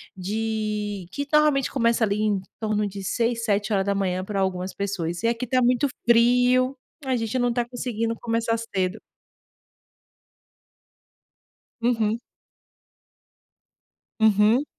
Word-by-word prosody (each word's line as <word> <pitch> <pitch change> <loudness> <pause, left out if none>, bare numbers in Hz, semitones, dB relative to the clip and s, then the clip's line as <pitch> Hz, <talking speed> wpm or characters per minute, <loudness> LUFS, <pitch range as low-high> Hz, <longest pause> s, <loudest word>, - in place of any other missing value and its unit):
de 210 -1 -3
que 285 +6 -4
normalmente 300 -3 +3
começa 235 -2 +2
ali 210 0 +1
em 210 -2 +1 0.2
torno 210 -1 0
de 195 0 -7
6, 230 +3 0
7h 200 -3 0
para 195 0 -3
algumas 185 -1 -1
pessoas 180 -3 -3
e - - +3
aqui 235 +2 -1
está 255 +2 +1
muito 250 +3 +3 0.2
frio, 250 +3 +4 0.3
a 260 -1 +1
gente 225 +2 -2
não 245 0 +2
está 240 0 0
conseguindo 230 -2 -2
começar 230 -1 0 0.2
cedo. 190 +2 -1 2.8
Uhum. 225 -2 +1 2.0
Uhum. 220 +4 +4
225 Hz, 110 wpm, -24 LUFS, 200-240 Hz, 2.8 s, frio